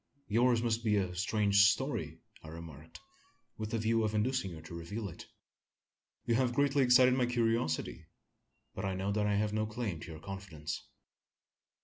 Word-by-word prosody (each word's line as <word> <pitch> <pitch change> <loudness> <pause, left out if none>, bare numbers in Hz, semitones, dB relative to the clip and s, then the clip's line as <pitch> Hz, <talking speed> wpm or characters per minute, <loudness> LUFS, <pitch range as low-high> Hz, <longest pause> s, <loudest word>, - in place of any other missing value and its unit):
"Yours 120 +2 +3
must 115 0 0
be 105 -2 +2
a 95 -2 -1
strange 100 +2 +2
story?" 100 - -1 0.2
I - - -12
remarked, 80 0 -10 0.6
with 110 0 -4
a - - +2
view 115 +1 +1
of 110 0 -1
inducing 105 -2 0
her 80 - -9
to 80 - -10
reveal 100 +6 -5
it. 80 - -11 1.0
"You 120 - +1
have 120 0 +1
greatly 140 0 +3
excited 125 0 +6
my 125 -1 +2
curiosity; 115 -9 -1 0.7
but 95 - -5
I 95 -1 -1
know 95 +2 -2
that 105 0 +1
I 105 - +1
have 105 +1 0
no 110 0 0
claim 110 -6 -4
to - - -9
your 80 - -8
confidence." 85 -4 -6
105 Hz, 170 wpm, -32 LUFS, 90-120 Hz, 1.0 s, excited